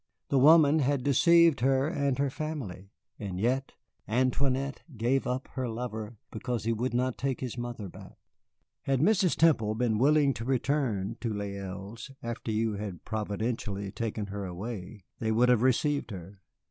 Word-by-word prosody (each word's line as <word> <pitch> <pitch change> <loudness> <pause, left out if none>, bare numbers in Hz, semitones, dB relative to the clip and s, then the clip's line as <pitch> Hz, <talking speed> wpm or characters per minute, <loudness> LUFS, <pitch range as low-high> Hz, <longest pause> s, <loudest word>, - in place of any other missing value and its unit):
The 135 - +3
woman 155 +1 +7
had 140 -2 +1
deceived 170 +3 +5
her 135 +2 +2
and 140 -4 0
her 140 -1 0
family, 125 - -5 0.3
and 95 -4 -4
yet 130 +5 0 0.3
Antoinette 130 +3 0 0.2
gave 125 +5 +1
up 125 +1 -2
her 130 -2 -3
lover 110 -1 -5
because 120 -1 -3
he 115 +1 +1
would 120 +2 -2
not 125 0 0
take 135 -1 -1
his 125 -3 -4
mother 120 -4 -5
back. - - -12 0.6
Had 135 -1 0
Mrs. 190 +2 +3
Temple 115 -10 +3
been 110 -2 +1
willing 145 +1 +4
to 115 - -6
return 120 -5 0
to 115 - -1
Les 100 -1 -3
Îles 100 +5 -7
after 120 -1 -4
you 110 0 0
had 100 -4 -6
providentially 105 -2 -3
taken 110 -1 -3
her 100 0 -5
away, 95 +2 -6 0.2
they 110 -1 0
would 120 +3 +4
have 125 -3 +4
received 140 +3 +2
her. 95 0 -9
120 Hz, 160 wpm, -29 LUFS, 105-135 Hz, 0.6 s, woman